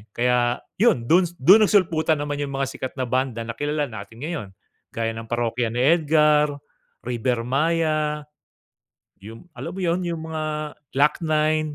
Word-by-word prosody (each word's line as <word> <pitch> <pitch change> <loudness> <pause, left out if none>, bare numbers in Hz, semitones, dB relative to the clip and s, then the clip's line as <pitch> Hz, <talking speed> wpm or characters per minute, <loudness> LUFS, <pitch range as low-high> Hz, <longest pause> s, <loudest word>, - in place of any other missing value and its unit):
Kaya 120 0 +1 0.2
yun, 210 - +3
dun 175 +7 +4
dun 195 +11 +6
nagsulputan 165 -5 +2
naman 145 0 -3
yung 140 -1 -3
mga 135 - 0
sikat 130 - -6
na 130 - -2
banda 125 -2 -1
na 115 - -5
kilala 145 -3 -1
natin 110 +3 -10
ngayon, 155 - -4 0.5
gaya 115 0 -1
ng 115 0 -8
Parokya 120 0 -1
ni 125 - 0
Edgar, 150 -1 +4 0.6
Rivermaya, 150 +6 0 1.0
yung 110 - -11
alam 175 +4 -7
mo - - -5
yun, 170 +1 +1
yung 165 -1 -4
mga 155 -1 -3 0.2
Glock 150 +5 +3
9 155 -1 +1
150 Hz, 150 wpm, -23 LUFS, 120-160 Hz, 1.0 s, dun